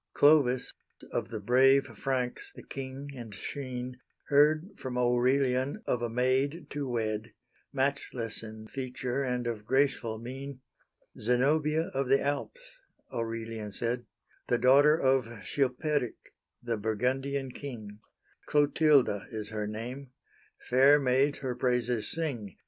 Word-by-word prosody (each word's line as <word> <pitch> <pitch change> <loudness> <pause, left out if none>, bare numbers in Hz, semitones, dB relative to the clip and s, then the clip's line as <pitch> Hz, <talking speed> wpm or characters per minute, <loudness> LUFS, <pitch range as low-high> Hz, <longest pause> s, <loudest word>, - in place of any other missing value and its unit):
Clovis, 140 -4 +4 0.4
of - - -2
the 110 -2 -4
brave 130 +5 +5
Franks, 130 -3 -2
the - - -11
king, 135 +1 -7
and 115 -5 -8
sheen, 125 0 -5 0.3
Heard 155 +5 +4
from 125 -1 -5
Aurelian 130 - +2
of 120 - 0
a 120 - -1
maid 130 +7 +1
to 140 -2 -3
wed, 110 -2 -2 0.4
Matchless 135 -4 -2
in 110 0 -9
feature, 130 +1 -3
and 125 -2 -1
of 115 -3 -3
graceful 130 -4 +1
mein 130 +3 -7 0.6
"Zenobia, 150 +7 +2
of 135 -1 -1
the 135 +1 +5
Alps," - - -4 0.3
Aurelian 115 -2 -4
said, 120 +3 -2 0.4
"The 120 - +2
daughter 145 +5 +5
of 125 -5 +1
Chilperic, 140 -1 -1 0.3
the 120 -2 -1
Burgundian 130 +5 -1
king, 110 -7 -8 0.5
Clotilda 145 -7 +3
is 110 -2 -5
her 105 -1 -3
name; 125 +6 -6 0.6
fair 135 +4 +6
maids 135 +2 +2
her 130 -2 -2
praises 125 -2 0
sing. 125 - -3
130 Hz, 120 wpm, -30 LUFS, 115-140 Hz, 0.6 s, fair